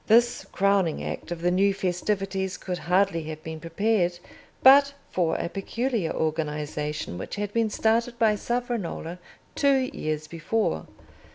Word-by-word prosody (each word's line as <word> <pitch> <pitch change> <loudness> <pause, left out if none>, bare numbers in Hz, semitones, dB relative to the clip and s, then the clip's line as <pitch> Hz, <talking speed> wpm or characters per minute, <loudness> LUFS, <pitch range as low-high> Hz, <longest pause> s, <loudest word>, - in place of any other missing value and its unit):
This 235 +2 +4
crowning 195 -4 +2
act - - -5
of 170 -1 -5
the 175 - +3
new 195 +2 +3
festivities 190 0 -1
could 180 -2 -4
hardly 185 -1 +2
have 155 0 -7
been 160 0 -6
prepared 175 +2 +1 0.5
but 280 +1 +8 0.2
for 170 -3 +1
a - - -1
peculiar 215 +1 -2
organisation 150 - -2
which - - -5
had 205 0 -3
been 230 -1 +2
started 230 +3 +1
by 225 -3 +4
Savonarola 210 -7 -3 0.3
two 270 -2 +2
years 155 0 -3
before. 165 - -1
190 Hz, 135 wpm, -26 LUFS, 165-225 Hz, 0.5 s, but